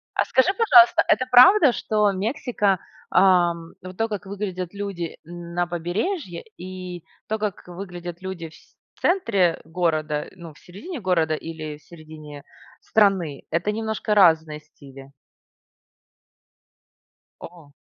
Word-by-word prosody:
А - - +2
скажи, 260 +6 +2
пожалуйста, 360 -6 +6
это 255 - +2
правда, 265 +4 +7
что 210 -2 +1
Мексика, 205 -1 -1 0.3
ам 175 -3 +3
вот 185 0 -10
то, 225 +2 -1
как 205 -2 -6
выглядят 190 -2 -5
люди 195 -5 -5
на 175 +1 -4
побережье, 175 - -3
и 180 -1 -8 0.2
то, 220 - -1
как 210 -3 -4
выглядят 175 -1 -8
люди 185 -3 -6
в 160 - -19
сь - - -21 0.2
в - - -28
центре 205 - +1
города 155 -3 -2
ну 170 -3 -11
в - - -20
середине 285 - -9
города 165 -5 +1
или 155 -2 -7
в - - -28
середине 155 -3 -12 0.4
страны- 190 -9 +1
это 170 +5 0
немножко 220 0 -3
разные 160 -6 +4
стили? 140 -3 -15 2.3
О! 165 -4 -13
180 Hz, 130 wpm, -23 LUFS, 165-210 Hz, 2.3 s, правда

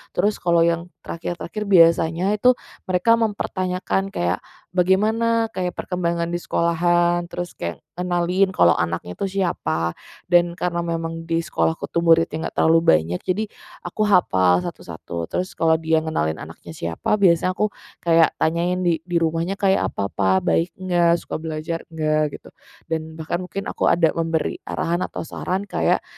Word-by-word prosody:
Terus 205 +4 +1
kalau 170 -1 +3
yang 170 +1 0 0.2
terakhir-terakhir, 175 +5 -5
biasanya 170 0 +4
itu 250 +4 +5 0.4
mereka 185 +6 +3
mempertanyakan 195 -3 -1
kayak, 85 +2 0 0.4
bagaimana 220 +5 +2
kayak 180 -1 -3
perkembangan 170 -2 -2
di 175 - -1
sekolahan, 175 +1 +1
terus 175 -1 -5
kayak 85 0 -5 0.2
ngenalin 180 +2 +1
kalau 85 - +4
anaknya 85 +1 -3
tuh - - -1
siapa. 125 - -1 0.3
Dan 175 -1 +4
karena 170 -1 -2
memang 165 0 -3
di 165 0 0
sekolah 165 - 0 0.2
tuh 170 - -1
muridnya 165 0 +5
itu - - -6
enggak - - -6
terlalu 165 +1 +5
banyak, 80 +3 +3
jadi 195 +4 0 0.4
aku 215 - -1
hafal 95 - +3
satu-satu. 85 -1 -6
Terus 185 +1 -3
kalau 160 -1 +3
dia 160 0 +2
ngenalin 80 - -1
anaknya 85 - -10
siapa, 85 - -1
biasanya 185 -1 +3
aku 210 -1 +1 0.3
kayak 165 -1 +4
tanyain, 175 +3 0
"Di 165 -2 +2
di 175 0 -6
rumahnya 165 +3 0
kayak 195 -1 +2
apa 100 0 -3
Pak, 95 -1 +2
baik 170 +2 +2
enggak, 175 -2 +2
suka - - -5
belajar 160 +1 -4
enggak?" 155 -2 0
gitu. - - -16 0.4
Dan 160 -1 -4
bahkan 160 +2 -3
mungkin 195 +1 -5
aku - - 0
ada 165 -2 +3
memberi 165 -1 -1
arahan 170 +1 -1
atau - - -6
saran, 190 +4 -3
kayak, - - 0
170 Hz, 155 wpm, -22 LUFS, 160-185 Hz, 0.4 s, itu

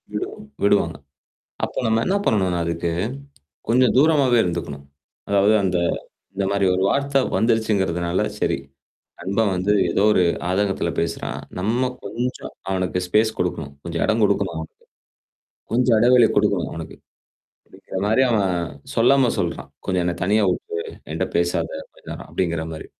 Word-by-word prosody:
விடுவாங் 290 - -5 0.2
விடுவாங்க. 90 -6 +2 0.7
அப்ப - - -7
நம்ம 110 0 +2
என்ன 195 +2 +2
பண்ணணும்னா 95 -5 +2
அதுக்கு? 85 0 -2 0.8
கொஞ்சம் 125 +1 +4
தூரமாகாவே 140 -5 +4
இருந்துக்கணும். 75 -5 -4 0.4
அதாவது 100 +2 +4
அந்த 90 -1 +1 0.6
இந்த 100 0 0
மாதிரி 100 -1 +2
ஒரு 95 - 0
வார்த்தை 140 +2 +1 0.2
வந்துருச்சுங்கிறதுனால 100 -6 +1 0.2
சரி. - - +1 0.6
நண்பன் 100 +3 0
வந்து 90 +3 +1 0.2
ஏதோ 100 - +2
ஒரு 95 - +4 0.3
ஆதங்கத்தில 100 +1 0
பேசுறான். - - -3 0.2
நம்ம 120 +6 0
கொஞ்சம் 125 +2 -4 0.2
அவனுக்கு 95 -1 -1
ஸ்பேஸ் 110 +4 +3
குடுக்கணும். 80 -5 -2
கொஞ்சம் 85 -1 -3
இடம் 110 +1 +2
கொடுக்கணும் 100 -3 +1
அவனுக்கு. 80 - -10 0.9
கொஞ்சம் 125 -1 +3
எடைவெளி 120 0 +6
கொடுக்கணும் - - +2
அவனுக்கு! - - -7 0.7
அப்படிங்கிற 95 - -8
மாதிரி 110 +5 +3
அவன் 100 -4 +2 0.5
சொல்லாம 125 +1 +4
சொல்றான். 70 -7 -3 0.2
கொஞ்சம் 90 -2 0
என்ன 90 0 0
தனியா 105 +2 +3
விட்டுடு. 85 -1 -3 0.3
என்கிட்ட - - -1
பேசாத 85 0 0 0.2
அந்த - - -23
நேரம் - - -8
அப்டிங்கிற 85 -3 -1
மாதிரி. 80 - -8
100 Hz, 135 wpm, -22 LUFS, 90-115 Hz, 0.9 s, எடைவெளி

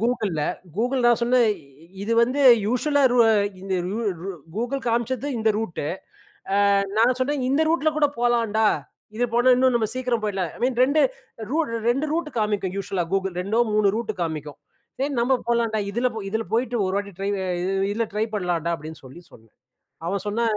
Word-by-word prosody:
Googleல 220 -9 0 0.3
Google 250 +4 0
நான் 240 -1 +4
சொன்னேன் 240 -1 +4 0.5
இது 220 +3 -1
வந்து 255 +4 0 0.3
யூசுவல்லா 285 +6 +1
ருவ 240 -1 +5 0.2
ரு 200 - +1 0.2
இந்த 195 0 -4 0.2
கூ 210 +4 -3 0.6
Google 245 +5 -2
காம்ச்சது 240 +3 -1
இந்த 220 0 +2
ரூட்டு 220 -9 -4 0.9
ஆ - - +4 0.2
நான் 240 +3 +4
சொன்னேன் 275 +1 0
இந்த 275 +4 +2
ரூட்ல 320 -1 +2
கூட 300 -1 +4
போலான்டா, 230 -3 +2 0.5
இது 245 - +1
போனா 245 +2 +5
இன்னும் 255 0 +3
நம்ம 220 -2 0
சீக்கிரம் 250 -3 -1
போயிடலாம் 190 -5 -2
ஐ - - -13
மீன் 250 -1 0
2 280 +4 +3 0.5
ரூட் 310 -2 0 0.2
2 270 +6 +1
ரூட் 325 -1 -1
காமிக்கும் 205 -3 -1
யூசுவல்லா 195 -2 -2
Google 190 -1 0
2டோ 205 +5 0
3 210 -2 +4
ரூட் 225 -1 -2
காமிக்கும். 155 -3 -5 0.4
சரி, 275 +2 -1
நம்ம 245 +3 +2 0.2
போலான்டா 230 -2 +1
இதில 240 +5 +1 0.2
இதில 220 +2 -1
போயிட்டு 240 +1 0
1 185 - -2
வாட்டி 200 0 -5
ட்ரை 195 +1 -2
இ - - -2 0.5
இதில 230 +2 -1
ட்ரை 210 +1 +1
பண்லான்டா 170 -3 -1
அப்டின்னு 160 0 -10
சொல்லி 130 +7 -12
சொன்னேன். 110 -1 -19 0.5
அவன் 195 +2 -2
சொன்னான் 220 +1 0
230 Hz, 170 wpm, -23 LUFS, 200-250 Hz, 0.9 s, ருவ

